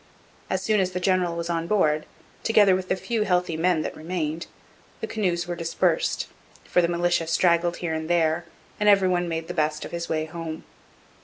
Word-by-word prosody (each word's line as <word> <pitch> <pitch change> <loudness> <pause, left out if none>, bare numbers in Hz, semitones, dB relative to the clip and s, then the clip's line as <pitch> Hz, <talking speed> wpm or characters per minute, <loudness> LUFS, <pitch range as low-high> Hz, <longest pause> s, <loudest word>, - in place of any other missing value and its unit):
As 190 0 -1
soon 215 0 +2
as 185 -1 0
the 180 - -1
General 180 -2 +1
was 170 0 -3
on 165 -1 -1
board, 155 -7 +2 0.3
together 205 -4 +5
with 185 0 -4
the - - +2
few 225 +3 -2
healthy 180 -4 +1
men 165 -1 +2
that - - -4
remained, 165 -1 -3 0.5
the - - -3
canoes 180 -5 -1
were 175 - -3
dispersed, 170 - 0 0.4
for 180 - +2
the 170 - +2
militia 175 -1 +1
straggled 170 +1 +2
here 170 -2 -3
and 160 0 -3
there, 170 0 +2 0.3
and 210 0 +4
every 195 -2 +5
one 175 -1 0
made 165 0 -3
the 175 - -4
best 155 -2 0
of - - -8
his 170 0 -4
way 155 -1 0
home.' 160 0 -6
175 Hz, 200 wpm, -25 LUFS, 165-185 Hz, 0.5 s, together